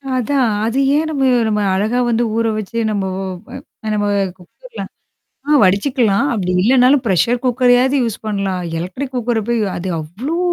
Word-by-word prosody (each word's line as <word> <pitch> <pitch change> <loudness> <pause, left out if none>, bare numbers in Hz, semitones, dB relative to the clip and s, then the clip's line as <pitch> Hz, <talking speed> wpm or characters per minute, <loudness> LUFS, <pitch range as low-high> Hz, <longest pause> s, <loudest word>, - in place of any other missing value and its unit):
அதான். 255 0 +1 0.2
அது 240 +4 0 0.2
ஏன் 315 +1 +1
நம்ம 275 -3 -1 0.2
நம்ம 210 -1 0
அழகா 220 +6 0
வந்து 235 +1 +1
ஊற 230 0 +1
வச்சு 215 +2 -4
நம்ப 200 -2 -1 0.2
ஓ - - -4 0.2
வ - - -18 0.4
ஓ - - -2
நம்ப 205 -1 0 0.3
குக்கர்ல 465 - -12 0.7
ஆ - - 0
வடிச்சுக்கலாம். 205 +4 +2
அப்படி 185 -5 -1
இல்லன்னாலும் 255 +3 +4
பிரஷர் 230 +5 +1
குக்கரையாவது 250 +2 +3
யூஸ் 225 -2 -2
பண்ணலாம். 195 -3 -2 0.2
எலக்ட்ரிக் 255 +10 -5
குக்கர 240 -1 0
போய் 235 -1 +1 0.2
அது 185 +2 -4
அவ்ளோ 220 - -4
230 Hz, 160 wpm, -17 LUFS, 200-255 Hz, 0.7 s, இல்லன்னாலும்